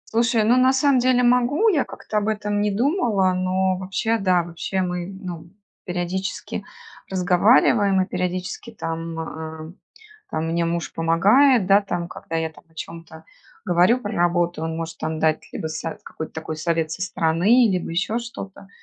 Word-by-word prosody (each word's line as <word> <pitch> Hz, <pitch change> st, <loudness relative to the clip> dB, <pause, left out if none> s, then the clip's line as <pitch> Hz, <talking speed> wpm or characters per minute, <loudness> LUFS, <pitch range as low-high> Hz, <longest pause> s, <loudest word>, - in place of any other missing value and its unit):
Слушай, 230 Hz, -1 st, +3 dB
ну 240 Hz, +4 st, +4 dB
на 255 Hz, +1 st, +4 dB
самом 265 Hz, -1 st, +3 dB
деле 250 Hz, 0 st, +3 dB
могу, 250 Hz, -, +3 dB
я 305 Hz, -10 st, +2 dB
как-то 215 Hz, -, -5 dB
об 205 Hz, -, -3 dB
этом 210 Hz, -1 st, -1 dB
не 210 Hz, -, +1 dB
думала, 215 Hz, -, +1 dB
но 185 Hz, 0 st, 0 dB
вообще 195 Hz, +5 st, -1 dB
да, 185 Hz, -3 st, +2 dB
вообще 175 Hz, +3 st, -3 dB
мы, 180 Hz, -1 st, -3 dB
ну, 180 Hz, -4 st, -8 dB, 0.4 s
периодически 180 Hz, +2 st, -3 dB, 0.5 s
разговариваем, 195 Hz, +2 st, +4 dB
и 185 Hz, -, +2 dB
периодически 180 Hz, +4 st, -4 dB
там, 165 Hz, -2 st, -4 dB
э, 160 Hz, 0 st, -7 dB, 0.6 s
там 160 Hz, +1 st, -2 dB
мне 170 Hz, 0 st, 0 dB
муж 170 Hz, 0 st, -3 dB
помогает, 205 Hz, +9 st, +4 dB
да, 200 Hz, +2 st, +5 dB
там, 175 Hz, -3 st, -3 dB
когда 165 Hz, -1 st, -7 dB
я 160 Hz, -1 st, -1 dB
там -, -, -18 dB
о 160 Hz, -, -28 dB
чём-то 160 Hz, 0 st, -9 dB, 0.4 s
говорю 180 Hz, +7 st, +4 dB
про 205 Hz, -1 st, -4 dB
работу, 175 Hz, -2 st, +1 dB
он 160 Hz, 0 st, -3 dB
может 165 Hz, 0 st, -6 dB
там 155 Hz, 0 st, -3 dB
дать 155 Hz, 0 st, 0 dB
либо -, -, -5 dB
со 160 Hz, 0 st, -4 dB
какой-то 160 Hz, -, -7 dB
такой 160 Hz, 0 st, -6 dB
совет 165 Hz, 0 st, -1 dB
со 175 Hz, -, -5 dB
стороны, 190 Hz, +7 st, +3 dB
либо 180 Hz, -2 st, -2 dB
еще 180 Hz, +7 st, -1 dB
что-то. 200 Hz, -4 st, -9 dB
185 Hz, 165 wpm, -22 LUFS, 165-215 Hz, 0.6 s, да